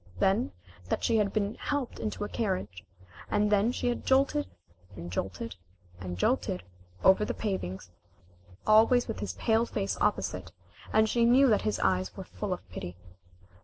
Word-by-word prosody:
Then 190 - +2 0.4
that - - -1
she 230 - +3
had 205 -2 +2
been 205 -1 0
helped 285 -4 -2
into 215 -1 -3
a - - -2
carriage, 185 - -3 0.5
and 210 0 +2
then 210 +3 +3
she - - -4
had 240 - -1
jolted 265 - +2 0.5
and 85 +1 -7
jolted 95 +5 -4 0.4
and 90 -1 -5
jolted 90 0 0 0.4
over 190 +2 +6
the - - -2
pavings, 95 - -4 0.7
always 225 +3 +5
with - - -4
his 100 -3 -3
pale 225 - +1
face 195 -3 -2
opposite, - - 0 0.4
and 220 0 +4
she 235 +2 +2
knew 250 +4 +6
that 210 - +3
his 215 - -1
eyes 185 +1 +1
were 190 - -5
full 205 +2 -5
of 180 - -4
pity. 90 0 -6
205 Hz, 165 wpm, -29 LUFS, -, 0.7 s, over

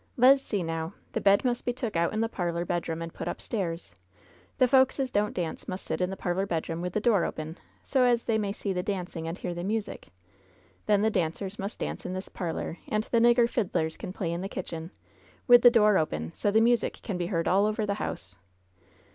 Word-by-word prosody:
Le's 265 +3 +7
see, 205 -8 -2
now: 165 +2 -4 0.2
The - - -1
bed 200 +4 +4
must 240 -1 0
be 245 - -1
took 240 -5 -4
out'n 170 +6 +1
the 225 - +2
parlor 175 -5 -2
bedroom 165 -1 -2
and 165 - -7
put - - -6
upstairs. 170 - -4 0.6
The 255 - +5
folks 265 +1 +4
as 265 -2 -1
don't 210 +1 0
dance 170 -3 -4
must 185 +1 -5
sit - - -2
in 180 - +1
the 190 - -5
parlor 190 +2 -1
bedroom, 165 -1 -2
with 180 0 -3
the - - +1
door 210 -5 +3
open, 155 +1 -5 0.2
so 265 -2 +2
as 240 -2 +3
they 220 -2 +1
may 205 -2 -1
see 200 -1 -3
the 180 - -1
dancing 180 -4 -4
and 165 +2 -4
hear 175 - -4
the 175 0 -5
music. 210 +2 -3 0.8
Then 205 -1 +3
the 220 - +3
dancers 190 +3 -2
must 200 +3 -4
dance - - -4
in 180 - -4
this 185 +1 -5
parlor, 170 -1 -4
and 215 0 0
the 230 - +1
nigger 240 0 +5
fiddlers 175 -9 -1
can - - -7
play 185 -3 -3
in 170 +1 -3
the 195 - -4
kitchen, 165 -3 -6 0.6
with 245 -1 +8
the 245 - +9
door 210 -4 +5
open, 80 - -2
so 205 - 0
the 220 +2 +4
music 240 +1 +2
can 195 -6 -3
be 175 - -1
heard 165 -3 -1
all 200 +3 +4
over 215 0 -1
the 200 - 0
house. 95 +1 -5
195 Hz, 225 wpm, -28 LUFS, 170-225 Hz, 0.8 s, the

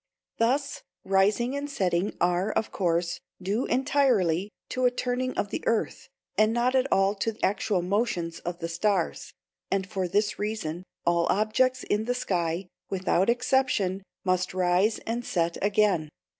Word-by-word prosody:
Thus 270 +5 +1 0.2
rising 205 +7 +2
and 285 +1 -3
setting 190 -7 0
are, 180 +4 +1
of 220 - -1
course, 170 -2 0 0.2
due 200 +6 -1
entirely 225 - +2 0.2
to 255 0 0
a - - +7
turning 250 +1 -2
of 205 - 0
the - - -3
earth, 230 - -1 0.3
and 215 +1 +4
not 240 +2 +1
at 265 +1 +2
all 195 +1 +3
to 220 +2 -2
actual 195 -1 +1
motions 180 -4 -1
of 175 0 -5
the 165 -1 -4
stars; 180 +2 -1 0.4
and 195 -1 0
for 190 -2 -2
this 205 +4 0
reason, 205 -6 -3 0.2
all 170 0 +2
objects 250 +5 +2
in 210 +1 0
the 245 +1 0
sky, 175 -5 -1 0.2
without 190 +1 +1
exception, 235 -6 +1 0.2
must 185 0 0
rise 185 +4 +2
and 235 +2 -2
set 170 -5 -1
again. 200 -6 +2
200 Hz, 150 wpm, -27 LUFS, 180-235 Hz, 0.4 s, a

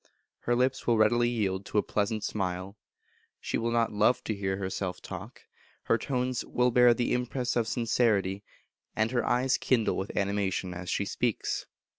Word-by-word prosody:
Her 120 - 0
lips 125 +2 0
will 120 -2 +4
readily 120 +2 +4
yield 100 -5 -1
to - - -2
a 105 - +4
pleasant 105 +1 -1
smile; 95 -1 -3 0.6
she - - -2
will 115 +1 0
not 115 -1 +1
love 110 +4 +3
to 110 - -2
hear 95 -2 -2
herself 95 -1 -3
talk; - - -9 0.4
her - - +2
tones 125 -2 -1
will 125 0 +1
bear 120 0 +6
the 120 0 0
impress 125 0 -1
of 115 -2 +1
sincerity, 105 -5 +1 0.5
and 110 +1 +1
her 120 -2 +1
eyes 125 +2 +2
kindle 120 -4 +1
with 95 - -4
animation 100 -2 -1
as 90 0 -6
she 100 - 0
speaks. 120 +2 -2
110 Hz, 170 wpm, -29 LUFS, 100-120 Hz, 0.6 s, bear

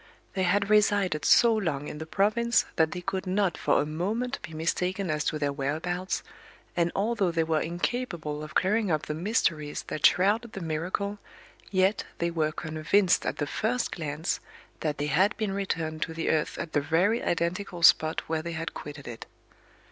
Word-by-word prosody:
They 190 - -1
had 200 +2 +1
resided 200 -6 +3
so 235 -1 +6
long 165 -10 -1
in 150 - -7
the 160 - -6
province 215 +6 +2
that 160 -1 +3
they 180 - -5
could 190 +1 -3
not 190 -1 +1
for - - +2
a - - +1
moment 210 - -2
be - - -8
mistaken 180 +3 -1
as 150 -1 0
to 155 - 0
their 145 -1 -1
whereabouts, 160 +7 -2 0.5
and 170 -1 +2
although 205 -2 +1
they 165 -1 +1
were 160 -1 +1
incapable 175 -4 -3
of 155 +1 -9
clearing 210 +2 +2
up 155 -2 0
the 150 - -3
mysteries 160 -4 0
that 155 - -4
shrouded 215 +5 +4
the - - -5
miracle, 180 +5 -2 0.5
yet 190 +1 +2
they 170 0 0
were 155 -2 0
convinced 165 +4 +1
at - - -2
the 145 - -1
first 225 +11 -1
glance 155 0 -2 0.4
that 150 -2 -2
they 145 - -1
had 185 - +2
been 215 -3 -1
returned 165 -5 -2
to 165 - -2
the 165 - 0
earth 155 -1 0
at 165 - -5
the 145 - +3
very 175 +10 +2
identical 175 +1 -2
spot 160 -1 +5
where 160 0 -2
they 170 +1 -5
had 165 +1 -4
quitted 145 -2 -8
it. 115 -2 -8
170 Hz, 185 wpm, -28 LUFS, 155-200 Hz, 0.5 s, so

